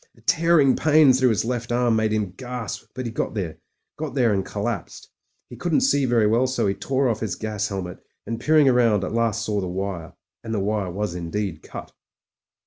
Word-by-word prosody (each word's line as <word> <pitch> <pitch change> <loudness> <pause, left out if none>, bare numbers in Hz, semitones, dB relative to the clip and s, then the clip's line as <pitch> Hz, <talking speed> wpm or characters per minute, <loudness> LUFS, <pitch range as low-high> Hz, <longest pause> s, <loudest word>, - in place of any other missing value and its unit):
A - - -20
tearing 165 -6 +4
pain 155 -3 +5
through 130 0 +3
his 110 -1 0
left 120 0 -3
arm 120 -1 +2
made 110 -1 +1
him 105 -3 -1
gasp, 125 -3 -6
but 130 0 -4
he 115 - -3
got 115 - -3
there 90 -6 -4 0.2
— - - -56
got 155 -2 -4
there 120 -5 +3
and 95 -1 0
collapsed. 105 0 -5 0.4
He - - -10
couldn't 175 +6 +1
see 145 - +3
very 120 -3 +3
well, 115 +5 +3
so 130 - 0
he 100 - +1
tore 135 +5 0
off 110 -3 0
his 105 -5 -3
gas 105 -2 -3
helmet, 95 -3 -5 0.3
and, 115 +2 -4
peering 155 +1 +4
round, 120 -6 +3
at 95 - -3
last 115 -1 0
saw 105 -2 -1
the 95 - -3
wire. 90 -2 -4 0.3
And 115 -1 -3
the - - 0
wire 100 -1 -1
was 100 +1 -3
indeed 90 0 -4
cut. - - -9
115 Hz, 215 wpm, -23 LUFS, 100-130 Hz, 0.4 s, pain